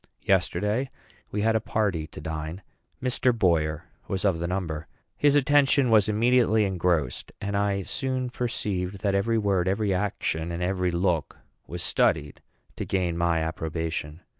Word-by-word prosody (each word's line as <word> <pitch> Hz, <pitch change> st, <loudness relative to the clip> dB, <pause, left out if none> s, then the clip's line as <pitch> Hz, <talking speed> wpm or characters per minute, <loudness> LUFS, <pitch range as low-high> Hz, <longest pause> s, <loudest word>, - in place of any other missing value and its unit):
Yesterday 105 Hz, +6 st, +1 dB, 0.4 s
we 105 Hz, 0 st, -2 dB
had 110 Hz, 0 st, +3 dB
a -, -, +4 dB
party 95 Hz, -8 st, -1 dB
to -, -, -10 dB
dine. 80 Hz, +4 st, -5 dB, 0.4 s
Mr. 125 Hz, 0 st, +2 dB
Boyer 80 Hz, -6 st, +1 dB, 0.2 s
was 95 Hz, +1 st, -2 dB
of 95 Hz, -5 st, +2 dB
the 85 Hz, -, -2 dB
number. 85 Hz, -4 st, -3 dB, 0.3 s
His 145 Hz, -1 st, +3 dB
attention 140 Hz, -2 st, +4 dB
was 110 Hz, -2 st, +5 dB
immediately 110 Hz, 0 st, +3 dB
engrossed; 85 Hz, -8 st, 0 dB
and 100 Hz, 0 st, -3 dB
I 100 Hz, -1 st, +1 dB
soon 130 Hz, +2 st, -2 dB
perceived 100 Hz, -6 st, -3 dB
that 100 Hz, -2 st, +1 dB
every 110 Hz, +4 st, +2 dB
word, 100 Hz, -4 st, +1 dB
every 100 Hz, +1 st, +1 dB
action, 90 Hz, -4 st, -1 dB
and 85 Hz, +1 st, -3 dB
every 90 Hz, 0 st, 0 dB
look 85 Hz, -3 st, 0 dB, 0.3 s
was -, -, -5 dB
studied 75 Hz, 0 st, +1 dB, 0.4 s
to -, -, -2 dB
gain 90 Hz, -3 st, 0 dB
my 85 Hz, -1 st, +1 dB
approbation. 80 Hz, 0 st, -3 dB
95 Hz, 150 wpm, -26 LUFS, 85-110 Hz, 0.4 s, was